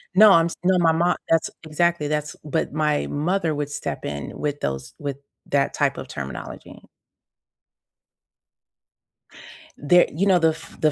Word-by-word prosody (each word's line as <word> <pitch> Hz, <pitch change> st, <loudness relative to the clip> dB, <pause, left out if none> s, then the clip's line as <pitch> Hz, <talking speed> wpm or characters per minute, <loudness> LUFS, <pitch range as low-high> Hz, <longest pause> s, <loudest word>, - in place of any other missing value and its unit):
No, 210 Hz, +2 st, +8 dB
I'm 165 Hz, -3 st, +6 dB
s 170 Hz, -, -6 dB
no, 185 Hz, 0 st, +3 dB
my 165 Hz, -2 st, +4 dB
mo 170 Hz, +2 st, +2 dB
that's 165 Hz, -1 st, +2 dB
exactly. 160 Hz, 0 st, 0 dB
That's 150 Hz, 0 st, -2 dB
but 150 Hz, -2 st, -2 dB
my 150 Hz, -1 st, 0 dB
mother 165 Hz, +2 st, 0 dB
would 145 Hz, -1 st, -3 dB
step 145 Hz, -, -5 dB
in 70 Hz, -1 st, -5 dB
with 145 Hz, -1 st, -2 dB
those 65 Hz, -1 st, -4 dB
with 140 Hz, -2 st, -4 dB, 0.3 s
that 140 Hz, -1 st, +1 dB
type 140 Hz, -1 st, 0 dB
of -, -, -7 dB
terminology. 70 Hz, -, -8 dB, 3.0 s
There 175 Hz, +5 st, +4 dB
you 175 Hz, +7 st, 0 dB
know, 190 Hz, -3 st, +4 dB
the 165 Hz, -1 st, +4 dB
f 160 Hz, +1 st, -8 dB
the 155 Hz, -, +4 dB
155 Hz, 155 wpm, -23 LUFS, 145-170 Hz, 3.0 s, No